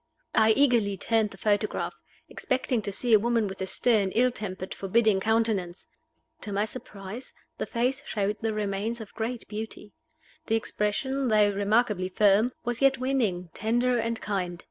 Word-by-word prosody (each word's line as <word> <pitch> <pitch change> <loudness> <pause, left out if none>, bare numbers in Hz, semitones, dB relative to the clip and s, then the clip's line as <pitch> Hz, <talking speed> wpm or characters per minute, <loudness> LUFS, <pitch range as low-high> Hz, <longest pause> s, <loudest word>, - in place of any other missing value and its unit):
I 220 0 +5
eagerly 235 -7 +3
turned 220 +1 +1
the 195 - -13
photograph, 210 +1 0 0.3
expecting 255 -2 -1
to 200 - -4
see 235 +4 +2
a 215 - +8
woman 230 0 +1
with 190 0 -7
a 190 - -2
stern, 215 -2 +2
ill 250 +2 +3
tempered, 185 -5 -5
forbidding 205 +1 +2
countenance. 215 -4 0 0.6
To 210 - -3
my 200 +1 +1
surprise, 215 0 -8 0.3
the - - -2
face 255 +4 0
showed 205 0 -1
the 225 -1 0
remains 210 +2 -2
of 220 -2 -9
great 230 +1 -4
beauty; 210 -1 -7 0.5
the 225 - +2
expression, 265 +5 -1
though 210 -2 +4
remarkably 205 -1 +1
firm, 210 +5 +4
was 240 +1 -2
yet 270 -1 +4
winning, 225 -10 -1
tender, 240 +2 +1
and 230 0 -2
kind. 180 -4 -3
220 Hz, 160 wpm, -27 LUFS, 200-235 Hz, 0.6 s, a